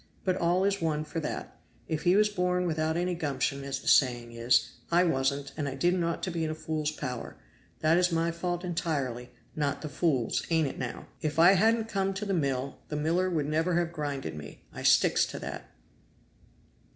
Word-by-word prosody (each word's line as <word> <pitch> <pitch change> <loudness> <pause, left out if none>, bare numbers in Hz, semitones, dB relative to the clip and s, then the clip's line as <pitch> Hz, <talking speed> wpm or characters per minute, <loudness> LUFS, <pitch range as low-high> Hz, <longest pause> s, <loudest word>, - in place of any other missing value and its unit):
But 185 -1 +1
all 175 +2 +2
is 200 -1 +1
one 155 -2 0
for 160 +2 -4
that; 155 - -5 0.3
if 155 -2 -2
he 175 +2 +5
was 210 +1 +5
born 180 -3 0
without 160 -1 0
any 180 +1 0
gumption, 140 -4 -2
as 135 -1 -3
the - - -11
saying 120 -3 +3
is, 115 +1 +2 0.2
I 175 +1 +5
wasn't, 140 -3 0
and 145 -2 -2
I 135 - -5
didn't 175 +5 +1
ought 170 0 -2
to 185 - -1
be 165 -1 -2
in 160 - -1
a 155 - -3
fool's 155 -1 -2
power; 130 -5 -5 0.5
that 160 +2 +4
is 180 0 +2
my 165 0 +1
fault 175 +1 -3
entirely, 140 -8 -2 0.3
not 145 -1 -1
the 155 - -4
fool's; 140 -5 0
ain't 160 -3 +2
it - - -6
now? 125 -2 -5 0.2
If 155 0 -2
I 170 +3 +8
hadn't 220 +3 +3
come 195 -2 -1
to 205 +2 -3
the 200 - -1
mill 140 -5 -1
the 150 - -3
miller 165 +5 +1
would 160 -5 0
never 160 +3 +1
have 170 -1 0
grinded 145 -4 -3
me! 75 -1 -10
I - - -7
sticks - - +4
to - - -7
that!" - - -7
160 Hz, 205 wpm, -29 LUFS, 140-175 Hz, 0.5 s, I